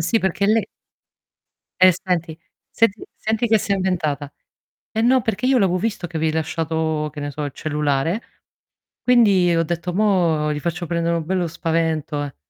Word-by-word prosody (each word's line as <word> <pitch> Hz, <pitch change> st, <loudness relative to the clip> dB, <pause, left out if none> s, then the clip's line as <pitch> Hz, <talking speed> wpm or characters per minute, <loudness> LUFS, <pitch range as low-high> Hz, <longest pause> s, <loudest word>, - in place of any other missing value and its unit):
sì, 170 Hz, +8 st, +2 dB
perché 190 Hz, 0 st, 0 dB
lei 215 Hz, -1 st, +2 dB, 1.1 s
Eh, 185 Hz, 0 st, +8 dB
senti 170 Hz, -2 st, -3 dB, 0.3 s
senti 225 Hz, -2 st, +1 dB
senti 220 Hz, +2 st, -1 dB
che 220 Hz, 0 st, +4 dB
si 200 Hz, -, -2 dB
è -, -, +4 dB
inventata: 155 Hz, -7 st, -1 dB, 0.6 s
"Eh 220 Hz, -, -1 dB
no, 255 Hz, +2 st, +4 dB
perché 225 Hz, +3 st, -1 dB
io 265 Hz, 0 st, +4 dB
l'avevo 190 Hz, -4 st, +2 dB
visto 205 Hz, -3 st, -2 dB
che 165 Hz, -, -7 dB
avevi 160 Hz, 0 st, 0 dB
lasciato" 160 Hz, -1 st, -1 dB
che 150 Hz, -, -7 dB
ne 145 Hz, -, -3 dB
so, 150 Hz, +1 st, -5 dB
il 145 Hz, -, -5 dB
cellulare, 150 Hz, -, -1 dB, 0.8 s
"quindi 200 Hz, -8 st, +4 dB
ho 165 Hz, -, +2 dB
detto: 170 Hz, +2 st, -3 dB
'mò 175 Hz, -7 st, +2 dB
gli 150 Hz, -, -2 dB
faccio 170 Hz, +2 st, -3 dB
prendere 170 Hz, 0 st, 0 dB
un 165 Hz, -2 st, -2 dB
bello 180 Hz, 0 st, 0 dB
spavento, 160 Hz, -2 st, -1 dB
eh'". 145 Hz, -2 st, -7 dB
170 Hz, 175 wpm, -21 LUFS, 155-200 Hz, 1.1 s, Eh